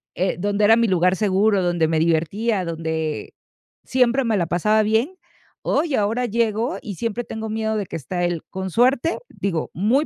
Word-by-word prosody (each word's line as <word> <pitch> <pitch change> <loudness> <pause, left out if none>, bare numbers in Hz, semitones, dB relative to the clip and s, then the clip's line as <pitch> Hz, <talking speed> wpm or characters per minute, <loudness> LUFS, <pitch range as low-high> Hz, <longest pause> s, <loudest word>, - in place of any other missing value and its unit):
eh, 185 +2 0
donde 205 +2 0
era 225 +2 +6
mi 235 0 +3
lugar 180 -1 +3
seguro 200 0 +2
donde 175 -2 +1
me 160 -1 +1
divertía, 175 +6 +1
donde 160 -2 -3 0.5
siempre 255 +1 +2
me 225 -3 +1
la 170 -3 0
pasaba 210 +6 +2
bien. 225 - 0 0.5
Oye, 300 -2 +1
ahora 220 +4 0
llego 230 +3 0
y 205 -4 -6
siempre 230 +3 -3
tengo 220 0 -5
miedo 220 0 -1
de 205 - -2
que - - -6
está 175 +4 -3
él. 175 -2 -1
Con 190 0 -4
suerte 255 - +2
digo, 175 -5 -3
muy 230 - +2
210 Hz, 180 wpm, -22 LUFS, 175-230 Hz, 0.5 s, era